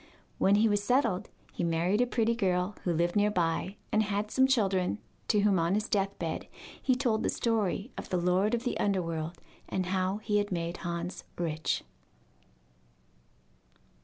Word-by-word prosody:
When 195 Hz, -, +5 dB
he 215 Hz, +2 st, +4 dB
was 205 Hz, -1 st, +1 dB
settled, 230 Hz, -5 st, +1 dB, 0.2 s
he -, -, -3 dB
married 170 Hz, +6 st, +2 dB
a 245 Hz, -, +3 dB
pretty 235 Hz, -1 st, +1 dB
girl 185 Hz, -3 st, 0 dB
who 175 Hz, -, +1 dB
lived 170 Hz, +1 st, +1 dB
near 205 Hz, 0 st, +4 dB
by, 180 Hz, 0 st, 0 dB, 0.2 s
and 215 Hz, -, +3 dB
had 210 Hz, 0 st, -1 dB
some 265 Hz, 0 st, +4 dB
children, 195 Hz, -9 st, +2 dB, 0.3 s
to 210 Hz, -, +3 dB
whom 200 Hz, -3 st, +3 dB
on 170 Hz, +3 st, +2 dB
his 215 Hz, +1 st, 0 dB
death 195 Hz, -1 st, 0 dB
bed 165 Hz, -2 st, -3 dB, 0.3 s
he 260 Hz, -, +2 dB
told 240 Hz, -4 st, +1 dB
the -, -, 0 dB
story 225 Hz, 0 st, 0 dB
of -, -, -8 dB
the 180 Hz, -, +1 dB
lord 185 Hz, +6 st, +2 dB
of 235 Hz, -, -4 dB
the 245 Hz, -, -2 dB
underworld, 170 Hz, -4 st, -1 dB, 0.3 s
and 185 Hz, -1 st, -1 dB
how 185 Hz, +1 st, +1 dB
he 210 Hz, -1 st, 0 dB
had 205 Hz, 0 st, 0 dB
made 170 Hz, -1 st, -2 dB
Hans 170 Hz, 0 st, -4 dB
rich. 160 Hz, -2 st, -1 dB
195 Hz, 170 wpm, -30 LUFS, 175-215 Hz, 0.3 s, When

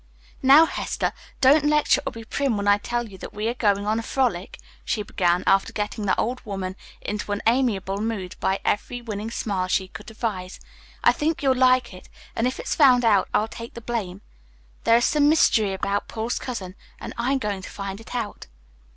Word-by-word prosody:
"Now, 280 Hz, +5 st, +8 dB
Hester, -, -, -2 dB, 0.3 s
don't 285 Hz, +3 st, +6 dB
lecture 300 Hz, 0 st, +3 dB
or -, -, -1 dB
be 230 Hz, -2 st, -9 dB
prim 265 Hz, -2 st, -1 dB
when 200 Hz, 0 st, -2 dB
I 205 Hz, 0 st, +5 dB
tell 240 Hz, +2 st, -2 dB
you 190 Hz, -3 st, -13 dB
that -, -, -9 dB
we 210 Hz, +2 st, -2 dB
are -, -, -1 dB
going 205 Hz, -4 st, +1 dB
on 215 Hz, +2 st, +1 dB
a -, -, -2 dB
frolic," 225 Hz, -7 st, -1 dB, 0.3 s
she 210 Hz, -, -1 dB
began, 180 Hz, -3 st, +1 dB
after 195 Hz, 0 st, +3 dB
getting 210 Hz, 0 st, -3 dB
the -, -, +2 dB
old 250 Hz, +3 st, -2 dB
woman 190 Hz, -3 st, -4 dB, 0.3 s
into 210 Hz, 0 st, -4 dB
an 205 Hz, -, -4 dB
amiable 220 Hz, -5 st, +1 dB
mood 210 Hz, -5 st, -3 dB
by 190 Hz, +1 st, 0 dB
every 245 Hz, +4 st, -1 dB
winning 220 Hz, -2 st, -5 dB
wile 190 Hz, -4 st, -1 dB
she 190 Hz, 0 st, 0 dB
could -, -, -11 dB
devise. 215 Hz, -5 st, -4 dB, 0.4 s
"I -, -, +7 dB
think 310 Hz, 0 st, -1 dB
you'll 265 Hz, -1 st, +4 dB
like 255 Hz, -2 st, +3 dB
it, 180 Hz, -, -13 dB, 0.3 s
and 230 Hz, -, +1 dB
if 255 Hz, -, -4 dB
it's -, -, -2 dB
found 255 Hz, -5 st, +5 dB
out 205 Hz, -4 st, +3 dB
I'll 215 Hz, -, +1 dB
take 230 Hz, +1 st, -9 dB
the -, -, -6 dB
blame. 210 Hz, -5 st, -4 dB, 0.6 s
There 230 Hz, -, +6 dB
is 240 Hz, -, +2 dB
some 295 Hz, -1 st, +3 dB
mystery 220 Hz, -10 st, +4 dB
about 200 Hz, +1 st, -2 dB
Paul's 225 Hz, +2 st, -3 dB
cousin, 200 Hz, -8 st, -5 dB, 0.3 s
and -, -, -7 dB
I'm 255 Hz, +4 st, 0 dB
going 205 Hz, -6 st, -3 dB
to -, -, -9 dB
find 195 Hz, +1 st, -6 dB
it 225 Hz, -, -9 dB
out." 225 Hz, -, -4 dB
220 Hz, 205 wpm, -24 LUFS, 200-250 Hz, 0.6 s, Now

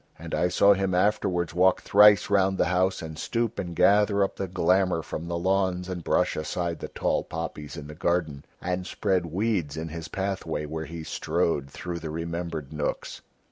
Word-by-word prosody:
And -, -, -8 dB
I 90 Hz, -, +2 dB
saw 100 Hz, +3 st, +5 dB
him 95 Hz, -1 st, 0 dB
afterwards 90 Hz, -4 st, +1 dB
walk 90 Hz, +2 st, +3 dB
thrice 105 Hz, -1 st, +6 dB
round 95 Hz, -1 st, +3 dB
the -, -, +3 dB
house 95 Hz, 0 st, +1 dB
and 80 Hz, -1 st, -7 dB
stoop 115 Hz, -2 st, -2 dB
and 85 Hz, -3 st, -4 dB
gather 100 Hz, +1 st, +4 dB
up 95 Hz, -, -2 dB
the 95 Hz, -, -3 dB
glamour 90 Hz, -1 st, +2 dB
from 80 Hz, +2 st, -6 dB
the 85 Hz, 0 st, -2 dB
lawns 95 Hz, 0 st, 0 dB
and 90 Hz, -2 st, -5 dB
brush -, -, +1 dB
aside 85 Hz, +2 st, -3 dB
the -, -, -5 dB
tall -, -, -1 dB
poppies 75 Hz, -3 st, -6 dB
in -, -, -7 dB
the 75 Hz, -, -9 dB
garden 80 Hz, -3 st, -1 dB, 0.2 s
and 90 Hz, +1 st, -3 dB
spread 95 Hz, -4 st, 0 dB
weeds 90 Hz, -4 st, -1 dB
in 80 Hz, +1 st, -4 dB
his 80 Hz, 0 st, -6 dB
pathway 95 Hz, -6 st, -3 dB
where 80 Hz, +1 st, -5 dB
he 80 Hz, +1 st, -7 dB
strode 80 Hz, -3 st, -1 dB
through 85 Hz, +4 st, -5 dB
the 80 Hz, -1 st, -6 dB
remembered 85 Hz, -2 st, -4 dB
nooks." 75 Hz, -1 st, -3 dB
90 Hz, 185 wpm, -26 LUFS, 80-95 Hz, 0.2 s, thrice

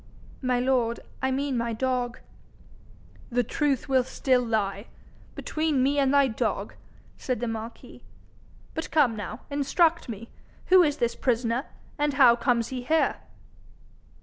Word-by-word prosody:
'My 255 Hz, -2 st, +1 dB
lord, 245 Hz, -2 st, +1 dB, 0.2 s
I 265 Hz, -, +1 dB
mean 270 Hz, +1 st, -1 dB
my 235 Hz, -1 st, -1 dB
dog.' 250 Hz, 0 st, -1 dB, 1.1 s
'The 245 Hz, -1 st, +1 dB
truth 275 Hz, +3 st, -1 dB
will 260 Hz, -2 st, +3 dB
still 255 Hz, 0 st, +1 dB
lie 215 Hz, -3 st, -2 dB, 0.5 s
between 310 Hz, -4 st, 0 dB
me 285 Hz, +2 st, +2 dB
and 270 Hz, -1 st, +3 dB
thy 280 Hz, -1 st, +5 dB
dog,' 220 Hz, -, -2 dB, 0.5 s
said 255 Hz, -4 st, -2 dB
the 240 Hz, -, -2 dB
marquis. 225 Hz, +1 st, -7 dB, 0.7 s
'But 320 Hz, -, -4 dB
come 280 Hz, -8 st, +3 dB
now, 215 Hz, +2 st, -6 dB
instruct 315 Hz, +3 st, +1 dB
me. 230 Hz, +1 st, -7 dB, 0.4 s
Who 370 Hz, 0 st, +8 dB
is 300 Hz, -3 st, +2 dB
this 235 Hz, -3 st, 0 dB
prisoner, 235 Hz, +2 st, 0 dB, 0.3 s
and 295 Hz, -1 st, +1 dB
how 250 Hz, -3 st, +7 dB
comes 235 Hz, -1 st, 0 dB
he 255 Hz, -1 st, -4 dB
here?' 315 Hz, +6 st, +1 dB
255 Hz, 140 wpm, -26 LUFS, 235-280 Hz, 1.1 s, Who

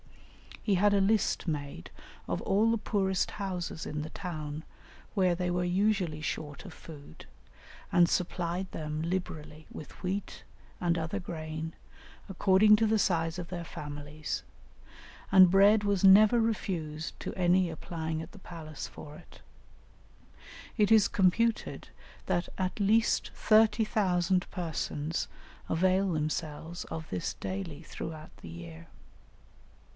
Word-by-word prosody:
"He 205 Hz, -, +2 dB
had 205 Hz, +3 st, +4 dB
a 200 Hz, -, +4 dB
list 205 Hz, -1 st, +1 dB
made 145 Hz, -, -4 dB, 0.4 s
of -, -, -1 dB
all 210 Hz, +4 st, +2 dB
the 230 Hz, -, +2 dB
poorest 195 Hz, -3 st, 0 dB
houses 180 Hz, -5 st, -4 dB
in 150 Hz, 0 st, -3 dB
the 155 Hz, +2 st, -6 dB
town, 155 Hz, -3 st, -5 dB, 0.5 s
where 185 Hz, -4 st, +3 dB
they 180 Hz, 0 st, -1 dB
were 180 Hz, 0 st, 0 dB
usually 180 Hz, -3 st, +1 dB
short 150 Hz, +1 st, -4 dB
of 185 Hz, -, -9 dB
food, 145 Hz, -, -12 dB, 0.7 s
and 175 Hz, -1 st, +5 dB
supplied 180 Hz, +1 st, -1 dB
them 155 Hz, 0 st, -4 dB
liberally 160 Hz, -3 st, -4 dB
with 155 Hz, -, -9 dB
wheat 190 Hz, +2 st, -3 dB, 0.4 s
and 170 Hz, -1 st, +1 dB
other 165 Hz, +5 st, -2 dB
grain 160 Hz, -2 st, -5 dB, 0.6 s
according 195 Hz, +2 st, +5 dB
to 220 Hz, 0 st, +2 dB
the 220 Hz, +1 st, +3 dB
size 165 Hz, -3 st, +1 dB
of 175 Hz, -, -6 dB
their 175 Hz, -2 st, -4 dB
families, 145 Hz, -1 st, -6 dB, 0.9 s
and 185 Hz, -2 st, +8 dB
bread 205 Hz, +2 st, +6 dB
was 200 Hz, -2 st, +1 dB
never 210 Hz, +4 st, +7 dB
refused 170 Hz, -8 st, -2 dB
to -, -, -5 dB
any 180 Hz, 0 st, +3 dB
applying 160 Hz, -1 st, -4 dB
at 160 Hz, -, -9 dB
the 200 Hz, -, -13 dB
palace 160 Hz, -4 st, -8 dB
for 150 Hz, 0 st, -11 dB
it; 175 Hz, -, -17 dB, 1.4 s
it 210 Hz, -1 st, +3 dB
is 215 Hz, -3 st, +7 dB
computed 215 Hz, +4 st, +1 dB, 0.4 s
that 175 Hz, -, 0 dB
at 185 Hz, +3 st, -1 dB
least 220 Hz, +3 st, +3 dB
30,000 210 Hz, -5 st, +3 dB
persons 160 Hz, -3 st, -3 dB, 0.4 s
avail 185 Hz, +2 st, +2 dB
themselves 155 Hz, +2 st, -3 dB
of 160 Hz, -1 st, -6 dB
this 165 Hz, -, -2 dB
daily 185 Hz, -6 st, -5 dB
throughout 155 Hz, 0 st, -8 dB
the 85 Hz, -, -11 dB
year. 85 Hz, -1 st, -10 dB
175 Hz, 130 wpm, -30 LUFS, 155-195 Hz, 1.4 s, and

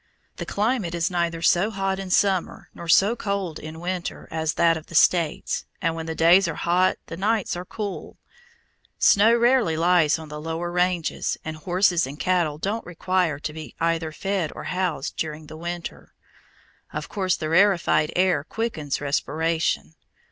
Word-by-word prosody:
The -, -, -5 dB
climate 210 Hz, -5 st, -1 dB
is 170 Hz, +2 st, 0 dB
neither 170 Hz, -1 st, -1 dB
so 180 Hz, +5 st, +3 dB
hot 195 Hz, -2 st, -2 dB
in 195 Hz, -1 st, -6 dB
summer 190 Hz, -1 st, +1 dB
nor 170 Hz, -, -9 dB
so 195 Hz, +7 st, +5 dB
cold 200 Hz, -7 st, -3 dB
in 155 Hz, +1 st, -8 dB
winter 180 Hz, 0 st, -4 dB
as 160 Hz, -1 st, -1 dB
that 165 Hz, -1 st, +4 dB
of 160 Hz, -1 st, -8 dB
the 170 Hz, -, -10 dB
States, 165 Hz, -1 st, +2 dB
and 165 Hz, 0 st, 0 dB
when 165 Hz, 0 st, -6 dB
the 160 Hz, -, -3 dB
days 170 Hz, +4 st, +5 dB
are 165 Hz, -, -3 dB
hot 180 Hz, +2 st, +2 dB
the -, -, -7 dB
nights 205 Hz, +1 st, 0 dB
are 175 Hz, +1 st, -6 dB
cool. 205 Hz, 0 st, -6 dB, 0.8 s
Snow 220 Hz, +3 st, +5 dB
rarely 235 Hz, -9 st, +3 dB
lies 170 Hz, -2 st, +3 dB
on 160 Hz, -1 st, -9 dB
the 150 Hz, 0 st, -7 dB
lower 165 Hz, +2 st, -3 dB
ranges, 180 Hz, -2 st, 0 dB
and 160 Hz, 0 st, -4 dB
horses 175 Hz, 0 st, +1 dB
and 145 Hz, +3 st, -9 dB
cattle 175 Hz, -5 st, +1 dB
don't 205 Hz, +8 st, -2 dB
require 180 Hz, -2 st, -1 dB
to 150 Hz, -, -4 dB
be 160 Hz, 0 st, -9 dB
either 165 Hz, -1 st, 0 dB
fed 190 Hz, -1 st, -2 dB
or -, -, -7 dB
housed 180 Hz, -7 st, -2 dB
during 155 Hz, -1 st, -4 dB
the 155 Hz, -, -10 dB
winter. 170 Hz, +1 st, -7 dB, 0.8 s
Of -, -, -5 dB
course 190 Hz, -4 st, 0 dB
the 155 Hz, -, -4 dB
rarefied 175 Hz, -3 st, +3 dB
air 185 Hz, -4 st, +2 dB
quickens 160 Hz, -8 st, -3 dB
respiration. 155 Hz, -, -1 dB
170 Hz, 170 wpm, -24 LUFS, 160-190 Hz, 0.8 s, so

